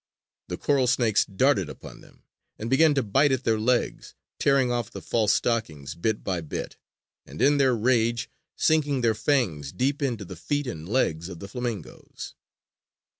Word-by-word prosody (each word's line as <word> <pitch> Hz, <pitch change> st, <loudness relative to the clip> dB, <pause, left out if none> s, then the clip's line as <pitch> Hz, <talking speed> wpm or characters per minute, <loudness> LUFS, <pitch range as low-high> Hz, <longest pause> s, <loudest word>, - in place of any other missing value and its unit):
The -, -, -4 dB
coral 140 Hz, -3 st, +2 dB
snakes 120 Hz, -4 st, +3 dB
darted 130 Hz, +8 st, +1 dB
upon -, -, -11 dB
them, -, -, -20 dB, 0.3 s
and 115 Hz, +3 st, -5 dB
began 150 Hz, +2 st, +5 dB
to 135 Hz, -, +2 dB
bite 135 Hz, +7 st, +3 dB
at 130 Hz, -1 st, 0 dB
their 110 Hz, -2 st, +1 dB
legs, 120 Hz, +2 st, 0 dB, 0.2 s
tearing 135 Hz, -3 st, +3 dB
off 120 Hz, -3 st, -1 dB
the -, -, -8 dB
false 110 Hz, -3 st, +1 dB
stockings 80 Hz, -, -1 dB
bit 105 Hz, +6 st, -2 dB
by 90 Hz, -3 st, -2 dB
bit, 80 Hz, -, -5 dB, 0.5 s
and, -, -, -11 dB
in 140 Hz, +4 st, +4 dB
their 130 Hz, -3 st, +4 dB
rage, 115 Hz, 0 st, +1 dB, 0.3 s
sinking 145 Hz, -4 st, +2 dB
their 115 Hz, -2 st, +3 dB
fangs 105 Hz, -, 0 dB
deep 140 Hz, +3 st, -1 dB
into 120 Hz, -7 st, -2 dB
the 90 Hz, -, -8 dB
feet 145 Hz, -, -2 dB
and 85 Hz, -9 st, -6 dB
legs 85 Hz, -9 st, 0 dB
of 90 Hz, -, -8 dB
the 100 Hz, -, -8 dB
flamingoes. 120 Hz, -1 st, -6 dB
120 Hz, 170 wpm, -26 LUFS, 100-135 Hz, 0.5 s, began